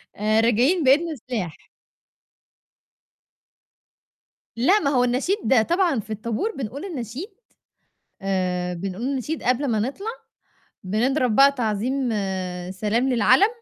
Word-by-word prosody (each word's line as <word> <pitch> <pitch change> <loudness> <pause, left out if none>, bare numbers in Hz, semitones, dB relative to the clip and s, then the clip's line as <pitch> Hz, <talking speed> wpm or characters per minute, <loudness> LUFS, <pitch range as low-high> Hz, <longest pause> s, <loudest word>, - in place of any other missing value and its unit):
آآ، 215 +2 +2
راجعين 250 - +3
بإيدنا 305 +4 +3
سلاح. 220 - -5 3.0
لأ، 365 - +4
ما 280 - 0
هو 250 -3 +3
النشيد 250 - +1
طبعًا 345 - +2
في 215 - -9
الطابور 230 - -2
بنقول 275 - -5
النشيد، 280 - -6 0.9
آآ، 180 -2 -1
بنقول 190 +5 -5
النشيد 275 +3 -3
قبل 255 +3 +1
ما 220 -3 +1
نطلع، 280 - -3 0.8
بنضرب 240 +5 +1
بقى 275 +1 +7
تعظيم 245 +2 -1 0.6
سلام 215 +6 0
للعَلَم، 265 - +4
250 Hz, 105 wpm, -23 LUFS, 215-280 Hz, 3.0 s, بقى